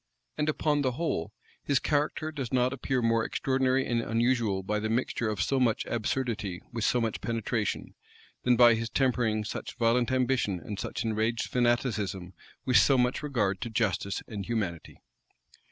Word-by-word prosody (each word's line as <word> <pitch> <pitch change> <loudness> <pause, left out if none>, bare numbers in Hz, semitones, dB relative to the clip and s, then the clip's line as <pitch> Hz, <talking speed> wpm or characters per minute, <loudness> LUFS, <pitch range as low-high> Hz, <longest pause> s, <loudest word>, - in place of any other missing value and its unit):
And, 150 0 0
upon 150 -1 +1
the 130 -3 0
whole, 130 - -2 0.3
his 140 - +1
character 150 +2 0
does 135 -6 -5
not 125 0 +2
appear 130 -2 -1
more 115 -1 +2
extraordinary 130 +1 +1
and 120 -1 0
unusual 115 -4 +1
by 105 +2 -1
the 110 +1 -2
mixture 115 -1 0
of 105 -4 -1
so 135 - +1
much 120 -4 +1
absurdity 115 -5 -2
with 115 -2 -2
so 125 - +2
much 115 -2 -2
penetration, 115 -2 -2 0.5
than 125 0 +3
by 120 0 +7
his 115 0 -2
tempering 120 -5 +1
such - - -6
violent 120 +1 +2
ambition 125 -7 +1
and 100 +3 -7
such 115 - -4
enraged 110 +1 0
fanaticism 110 -7 0 0.3
with 130 -2 +4
so 135 - +5
much 125 0 +1
regard 105 -10 -1
to 120 - -3
justice 105 -3 -1
and 100 -4 -6
humanity. 100 - -3
120 Hz, 165 wpm, -29 LUFS, 110-130 Hz, 0.5 s, by